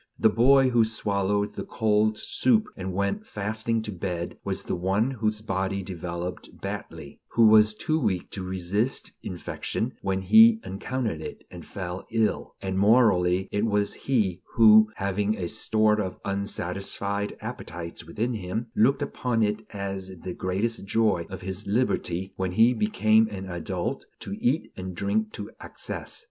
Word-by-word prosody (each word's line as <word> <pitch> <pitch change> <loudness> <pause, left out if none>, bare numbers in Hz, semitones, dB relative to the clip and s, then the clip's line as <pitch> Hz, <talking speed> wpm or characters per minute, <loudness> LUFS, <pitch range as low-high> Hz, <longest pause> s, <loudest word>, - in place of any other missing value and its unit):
The 110 - +4
boy 130 +3 +5
who 120 -2 +5
swallowed 100 -2 0
the - - -5
cold 110 -1 +1
soup 220 - +2
and 95 0 -4
went 100 - -2
fasting 110 +2 0
to 110 - -5
bed 90 -2 -4
was - - -2
the - - -3
one 95 +8 +1
whose 110 -4 -1
body 95 -1 -2
developed 90 -1 -6
badly, 70 - -7
who 115 - +5
was 110 0 +6
too 155 +7 0
weak 95 - -1
to 100 - -5
resist 95 +6 -1
infection 90 - -4
when 95 -1 -1
he 225 - +7
encountered 110 -3 -3
it, - - -8
and - - -9
fell 90 -1 -6
ill; 115 -1 0
and 95 0 -1
morally 95 -4 +4
it 105 - 0
was 105 -1 +1
he 100 -9 0
who, 110 -1 +7
having 100 +2 -1
a 90 - -2
store 110 +1 +2
of 95 -2 -4
unsatisfied 100 +1 -2
appetites 85 0 -7
within 110 +10 -2
him, 110 +3 -4
looked 130 +6 +3
upon 120 -3 -1
it 105 +1 0
as 95 -2 -5
the 90 - -4
greatest 100 +7 -2
joy 100 -4 +1
of 95 0 -7
his 95 +2 -5
liberty, 95 -5 0
when 95 -1 -2
he 115 +5 +5
became 110 - +3
an 95 -3 -6
adult, 85 -3 -4
to 100 - -6
eat 135 +7 +1
and 95 -1 -6
drink 105 +4 0
to 105 - -7
excess. - - -5
105 Hz, 155 wpm, -26 LUFS, 95-110 Hz, -, he